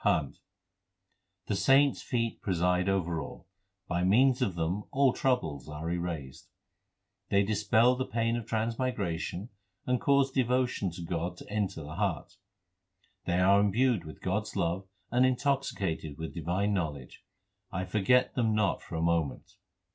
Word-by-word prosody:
CHHANT - - +1 1.1
The - - -1
saints 135 +6 +4
feet 115 -3 -2
preside 90 0 +1
over 85 -4 0
all; - - -9 0.4
by 85 0 0
means 125 +7 +4
of 100 -8 0
them 85 +5 -2
all 135 -2 +3
troubles 80 - -1
are 75 +2 -5
erased; 85 -6 -5 0.8
They 100 0 +4
dispel 110 +4 +3
the 130 +1 -3
pain 115 0 0
of 115 -2 -4
transmigration 110 -5 -2 0.4
and 125 -1 0
cause 140 -3 +3
devotion 125 -5 +1
to 85 - -7
God 85 +1 -3
to - - -12
enter 100 -6 -2
the 75 +3 -8
heart; 90 -4 -2 0.9
They 85 0 +1
are 100 +2 +5
imbued 110 0 +2
with 80 -1 -11
God 95 +3 +1
s - - -9
love 90 +3 -1 0.2
and 125 +1 +4
intoxicated 130 - 0
with 80 0 -6
divine 90 +5 -1
knowledge: 75 -9 -4 0.5
I 95 +1 -2
forget 110 +6 +2
them 115 -4 +1
not 105 -2 +1
for - - -8
a 80 - -1
moment. 85 -4 0
100 Hz, 145 wpm, -30 LUFS, 85-120 Hz, 1.1 s, are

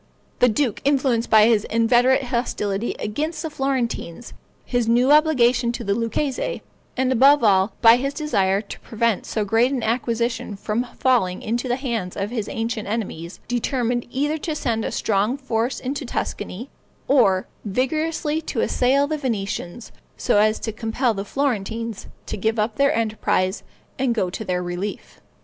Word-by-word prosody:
The 250 - +5
duke, 235 +1 0
influenced 265 -4 +1
by 215 -1 +7
his 220 -2 +3
inveterate 240 +4 +3
hostility 235 -4 -2
against 300 +12 -3
the 320 - -4
Florentines, 245 - -3 0.3
his 245 -2 0
new 245 +4 +4
obligation 255 -6 +4
to 240 - -5
the 200 -2 0
Lucchese, 235 +5 -2 0.3
and, 260 0 +1
above 275 +2 +5
all, 195 -1 +3
by 230 +1 +8
his 275 +2 -3
desire 200 -11 +1
to 205 - -10
prevent 230 -2 -1
so 215 -2 -1
great 225 +5 +2
an 260 -4 -2
acquisition 235 -1 -1
from 215 +5 -2
falling 230 -9 +1
into 240 +4 -2
the 245 - +1
hands 235 -9 -3
of 200 +2 -3
his 220 -5 -3
ancient 225 -1 -3
enemies, 200 -6 -4
determined 245 0 -1
either 295 +5 -1
to 315 0 -3
send 230 -6 -1
a - - -3
strong 215 +5 0
force 245 -2 -2
into 275 +3 -4
Tuscany, 235 -1 -5 0.4
or 195 -9 +3 0.2
vigorously 305 +7 -1
to 270 -7 -3
assail 270 +3 +2
the 305 +1 -3
Venetians, 215 -4 -4 0.3
so 205 - +2
as 215 +1 +3
to 220 - -3
compel 225 +3 -1
the 195 -1 -4
Florentines 230 -3 -2 0.2
to - - -5
give 220 +3 0
up 215 +1 -1
their 280 0 +3
enterprise 215 -4 0 0.4
and 255 -3 +1
go 185 -5 0
to 220 - -5
their 180 -3 -2
relief. 175 +4 -6
235 Hz, 160 wpm, -22 LUFS, 210-260 Hz, 0.4 s, by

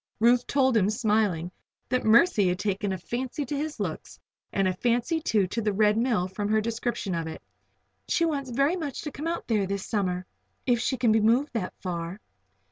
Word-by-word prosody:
Ruth 240 +2 +4
told 265 -3 +2
him, 205 -2 +3
smiling, 210 -6 +1 0.4
that 255 +1 +1
Mercy 220 - +5
had 180 0 +1
taken 200 0 -1
a 190 - -2
fancy 255 - -4
to 285 - -3
his 300 +2 -3
looks, - - -5 0.3
and 195 -1 +1
a 185 - +1
fancy, 245 - 0
too, 215 - +2
to 230 - -2
the 210 -1 +1
Red 210 +1 +3
Mill 225 -6 +1
from 205 +2 -3
her 220 0 +3
description 230 -2 -2
of 165 -1 -2
it. 160 - -6 0.7
"She 335 - +2
wants 280 -5 -2
very 275 +7 +2
much 300 -7 -4
to 300 - -4
come 300 +4 -5
out 340 - -2
there 210 -4 +1
this 200 0 -3
summer 185 -4 -1 0.4
if 245 -2 +3
she 260 +3 0
can 240 -3 +3
be 220 0 +4
moved 240 +7 +2
that 210 -6 -3
far." 175 +1 -4
220 Hz, 205 wpm, -27 LUFS, 195-260 Hz, 0.7 s, Mercy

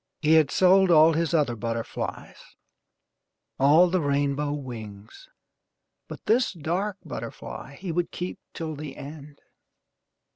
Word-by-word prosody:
He 155 0 +3
had 155 -3 +5
sold 190 0 +4
all 160 -1 +6
his 165 0 0
other 150 -8 +1
butterflies 115 0 -5 1.0
all 150 +6 +6
the 180 0 0
rainbow 145 0 0
wings 120 - -8 0.8
but - - -10
this 235 +1 +2
dark 180 +5 -2
butterfly - - -7
he 185 - -5
would 175 +1 -1
keep 180 +1 -6 0.2
till 160 -2 -4
the 145 -1 -8
end. 145 0 -10
155 Hz, 120 wpm, -26 LUFS, 140-175 Hz, 1.0 s, all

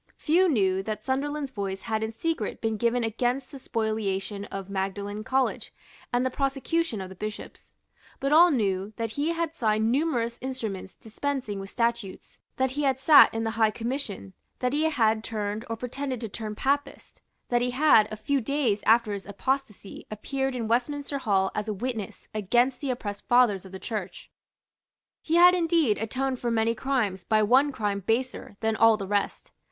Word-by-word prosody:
Few 350 +4 +3
knew 190 - +2
that 215 +1 -5
Sunderland's 280 +2 -2
voice 195 -4 -4
had 220 -2 -1
in 220 0 -2
secret 275 -1 -3
been 225 -1 -1
given 235 +2 +1
against 245 +4 -1
the 275 - -9
spoliation 210 -4 -2
of 195 -2 -6
Magdalene 200 +2 -3
College 260 +3 0 0.4
and 245 +1 +1
the 260 - 0
prosecution 275 - -1
of 185 - -6
the - - -9
Bishops; 215 +3 -8 0.4
but 275 - -1
all 340 +4 +8
knew 200 - 0
that 225 -1 -3
he 290 +7 -1
had 335 -1 -2
signed 220 -5 +1
numerous 245 -5 0
instruments 225 -8 -5
dispensing 230 -2 -4
with 195 0 -7
statutes, 230 -4 -3 0.2
that 260 -1 0
he 290 +3 -3
had 270 -2 +1
sate 295 +3 +8
in 225 0 -2
the 225 - -1
High 220 - +6
Commission, 225 - -5 0.2
that 250 0 -1
he 310 +2 +2
had 220 -6 +2
turned 210 0 -3
or 225 - -1
pretended 255 +2 -4
to 225 - -4
turn 215 +1 -6
Papist, 285 +5 -2 0.3
that 240 -1 +2
he 250 - +1
had, 250 -5 +4
a 215 - -5
few 275 +5 0
days 240 -4 0
after 225 -1 +4
his 200 -1 -6
apostasy, 210 0 -3
appeared 265 +5 -3
in 230 -3 -2
Westminster 280 +4 -1
Hall 195 -6 +1
as 210 +1 -3
a 215 - -2
witness 225 -1 -5
against 240 +6 +1
the 280 - -2
oppressed 210 -5 -4
fathers 240 -6 +4
of 190 - -11
the 190 - -6
Church. 215 +2 -6 0.9
He 325 - -1
had 355 +1 +8
indeed 330 - +2
atoned 255 +4 -2
for 240 - -1
many 230 0 +2
crimes 225 -7 -1
by 215 +3 +2
one 260 +7 +4
crime 205 -5 -2
baser 225 0 -2
than 220 0 +1
all 225 0 +5
the 200 - -5
rest. 200 +1 -2
230 Hz, 180 wpm, -27 LUFS, 210-270 Hz, 0.9 s, all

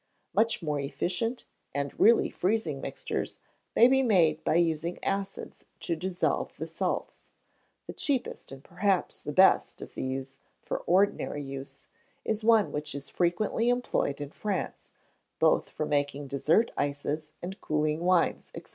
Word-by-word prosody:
Much 225 -4 +2
more 150 -2 -1
efficient 185 - -2 0.3
and 140 0 -1
really 230 +2 +6
freezing 220 +5 -1
mixtures - - -4 0.4
may 235 - +8
be 265 +1 +4
made 170 -10 +3
by - - +1
using 170 0 +1
acids 195 0 -3
to 170 - -2
dissolve 180 +2 -1
the - - -4
salts. - - -3 0.6
The - - -7
cheapest, 270 - -2
and 135 0 -10
perhaps 185 +2 0
the - - -5
best, 190 +5 +4
of - - -9
these 135 +1 -4 0.2
for - - -4
ordinary 185 -5 +2
use, 135 0 -8 0.4
is 220 0 -1
one 225 -2 +4
which 150 0 -4
is 140 0 -6
frequently 200 +6 +1
employed 245 - 0
in 145 -1 -6
France, 200 -1 -4 0.5
both - - +3
for 155 - -3
making 145 -1 -1
dessert 155 - +2
ices, 145 +2 -2
and 190 +3 -6
cooling 150 0 0
wines, 180 0 +1
&c. - - -7
170 Hz, 145 wpm, -29 LUFS, 145-205 Hz, 0.6 s, may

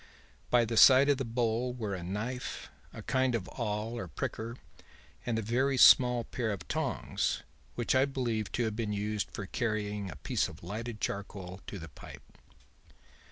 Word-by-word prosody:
By 120 -1 +4
the 115 0 -2
side 135 +4 +8
of 140 -2 +3
the - - 0
bowl 120 +1 0
were 110 -5 -3
a 95 - -4
knife, 110 +8 -4 0.2
a - - -9
kind 130 -2 +1
of 100 -5 -3
awl 110 -1 -3
or 95 - -5
pricker 110 - -4 0.7
and 115 -2 0
a 110 - -1
very 130 +5 +1
small 125 -1 +7
pair 115 0 -3
of 100 - -6
tongs, - - -1 0.3
which 120 - 0
I 130 +1 +5
believe 120 -6 -2
to 120 - +1
have 110 -2 -1
been 110 -2 -2
used 105 -1 -2
for 100 - -6
carrying 105 -2 -2
a - - -7
piece - - -1
of - - -12
lighted 110 +4 -5
charcoal 95 -2 -4
to 100 - -6
the 80 -3 -8
pipe. - - -12
115 Hz, 175 wpm, -31 LUFS, 105-125 Hz, 0.7 s, side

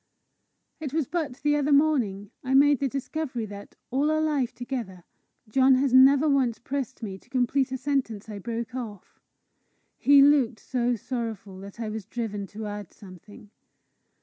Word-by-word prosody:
It 295 -4 -5
was 315 -2 +1
but 320 -7 -2
the 295 0 +3
other 295 0 +1
morning 250 -10 +2
I 265 0 0
made 285 -1 +5
the 280 - +1
discovery 275 -2 -4
that, 205 -1 -10 0.2
all 280 +4 +1
our 310 0 +2
life 295 -6 0
together, 235 -7 -6 0.4
John 260 +4 +4
has 265 0 +1
never 270 +3 +7
once 265 -5 +2
pressed 265 -1 -5
me 195 -3 -5
to - - -27
complete 260 +1 +1
a 260 - -2
sentence 255 -6 -2
I 210 -2 -7
broke 235 +3 -5
off. 220 -7 -8 0.8
He 280 0 +7
looked 275 -6 +3
so 245 -1 -1
sorrowful 220 -5 -5
that 200 +3 -11
I 225 -2 -3
was 215 -2 -5
driven 210 -4 -4
to 215 +2 -7
add 205 -2 -6
something. 200 +2 -14
250 Hz, 165 wpm, -26 LUFS, 215-275 Hz, 0.8 s, never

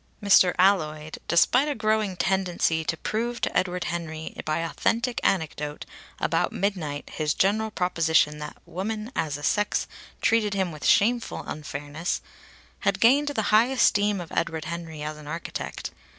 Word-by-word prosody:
Mr. 195 -3 +5
Alloyd, 155 -5 +2
despite 245 - +4
a 295 - -1
growing 215 -3 0
tendency 180 -4 +1
to 160 - -2
prove 235 +7 -2
to - - -1
Edward 180 -1 0
Henry 160 -1 -5
by 155 +1 0
authentic 230 +8 0
anecdote 150 -4 -1 0.3
about - - 0
midnight 170 -8 -2
his 150 -2 0
general 215 +3 +2
proposition 165 -6 +2
that 150 0 -7
women 215 +5 -4
as 150 -3 -1
a 145 - -10
sex 210 +6 +1 0.3
treated 215 -3 +2
him 190 -3 0
with 155 -2 -4
shameful 235 +3 +2
unfairness, 150 +2 -4 0.6
had - - 0
gained 275 +6 +5
the 280 -7 -1
high 220 +3 +6
esteem 210 -6 +2
of 170 -2 -8
Edward 160 -1 -2
Henry 165 -2 -6
as 155 0 -4
an 150 -1 -12
architect. 165 +2 -5
180 Hz, 150 wpm, -26 LUFS, 155-215 Hz, 0.6 s, high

